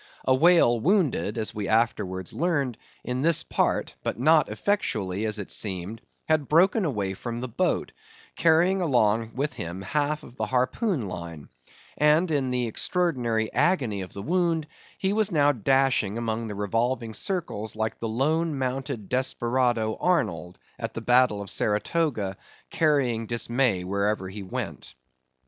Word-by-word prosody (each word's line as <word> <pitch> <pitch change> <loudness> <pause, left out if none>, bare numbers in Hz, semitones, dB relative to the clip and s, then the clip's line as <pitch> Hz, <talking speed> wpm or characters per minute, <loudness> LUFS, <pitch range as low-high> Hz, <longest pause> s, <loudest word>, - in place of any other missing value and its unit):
A 130 - +4
whale 135 -5 +5
wounded 155 - +1
(as 110 -1 -2
we 105 -2 -4
afterwards 105 -5 0
learned) 145 -7 0 0.3
in 125 +1 -2
this 165 +1 +4
part, - - 0
but - - -3
not 155 +4 +4
effectually, 105 - -1
as 110 0 -1
it 105 - -5
seemed, 95 +2 -3 0.3
had 155 -3 +2
broken 185 +6 +4
away 100 -10 -1
from 120 +4 -5
the 125 - -4
boat, 175 +10 -1 0.4
carrying 170 +4 +3
along 115 -7 +1
with 145 +3 -1
him 85 +3 -6
half 150 +7 -1
of 125 - -14
the - - -1
harpoon 130 - 0
line; 85 -4 -7 0.5
and 155 +3 +4
in 140 -4 +1
the 125 -1 0
extraordinary 120 - -1
agony 130 - +1
of 95 - -7
the 100 - -7
wound, 170 -2 +1 0.3
he 190 +1 0
was 215 -1 +1
now 145 -3 +4
dashing 130 -4 +1
among 115 0 -2
the 105 - -5
revolving 115 +3 -1
circles 110 - -3
like 110 0 -2
the 115 - -3
lone 155 +6 0
mounted 130 -4 -3
desperado 120 -2 0
Arnold, 90 - 0 0.2
at - - -5
the - - -4
battle 125 -5 +3
of 100 - -6
Saratoga, 105 - 0 0.3
carrying 130 -8 +1
dismay 120 -4 0
wherever 100 +1 -1
he 100 +2 -7
went. 95 -7 -6
125 Hz, 150 wpm, -26 LUFS, 105-150 Hz, 0.5 s, whale